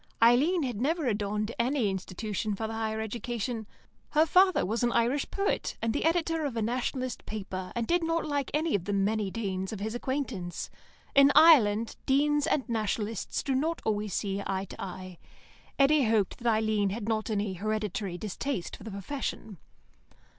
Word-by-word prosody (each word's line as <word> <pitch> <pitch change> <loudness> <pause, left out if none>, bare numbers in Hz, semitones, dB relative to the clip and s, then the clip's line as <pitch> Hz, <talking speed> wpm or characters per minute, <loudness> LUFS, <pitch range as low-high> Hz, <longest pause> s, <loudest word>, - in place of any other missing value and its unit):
Eileen 275 +10 +4
had 240 -5 -3
never 315 +3 0
adorned 210 -1 -1
any 250 -1 +2
institution 200 +2 -3
for 220 - -3
the 220 - -4
higher 220 0 -2
education. 230 0 -4 0.5
Her 310 +1 +5
father 370 +3 +4
was 225 +6 -1
an 240 -1 +2
Irish 245 +5 +1
poet, 395 0 -1
and 225 -1 0
the 290 - -1
editor 330 -1 +1
of 270 -5 -3
a - - 0
Nationalist 255 +2 -2
paper, 190 -3 -5
and 235 -1 0
did 345 +6 +1
not 330 0 0
like 285 -3 -1
any 310 +2 0
of 185 -4 0
the 205 - -2
many 200 +1 +1
Deans 190 -3 -3
of 215 - -5
his 215 +2 -3
acquaintance. 240 -8 -3 0.4
In 275 0 +7
Ireland, 230 -9 +6
Deans 295 +2 +3
and 270 - 0
Nationalists 220 -2 -2
do 275 - 0
not 315 +6 0
always 210 -2 -1
see 200 -1 -1
eye 190 0 -1
to - - -9
eye. 185 -1 -7 0.6
Eddy 275 0 +4
hoped 215 -3 +1
that 235 -1 +2
Eileen 215 -2 +1
had 210 +2 -4
not 220 -1 -1
any 205 -2 -1
hereditary 205 -1 -2
distaste 215 +2 -4
for - - -13
the 225 - -6
profession. 200 - -5
225 Hz, 175 wpm, -29 LUFS, 205-275 Hz, 0.6 s, In